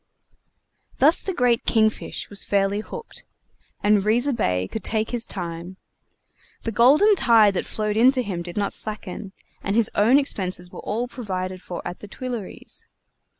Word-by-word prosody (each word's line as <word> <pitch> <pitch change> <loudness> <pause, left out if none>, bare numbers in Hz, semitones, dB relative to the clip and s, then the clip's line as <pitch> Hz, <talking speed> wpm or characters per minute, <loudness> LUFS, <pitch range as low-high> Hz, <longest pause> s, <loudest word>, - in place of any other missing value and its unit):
Thus 305 +5 +5
the 385 - -3
great 245 -8 +2
King 220 -1 +4
fish - - -7
was 200 -1 -3
fairly 200 0 +1
hooked, 460 - -7 0.6
and 205 -1 +4
Riza 240 +7 +2
Bey 90 - 0
could 220 - -6
take 220 -1 -1
his 240 -1 -1
time. 175 0 -6 0.9
The 230 - -2
golden 290 - +5
tide 225 - +5
that 185 - -2
flowed 215 -1 -2
in 245 +3 +6
to 255 -2 0
him 190 -5 -4
did 175 +2 -8
not 200 -1 0
slacken, 210 -2 -3 0.3
and 200 - -2
his 230 -2 +3
own 225 +6 +5
expenses 185 -10 -1
were - - -9
all 230 +4 -2
provided 185 -6 -5
for 175 -1 -7
at 175 - -7
the 210 - -10
Tuileries. 240 -2 -7
215 Hz, 165 wpm, -23 LUFS, 190-240 Hz, 0.9 s, in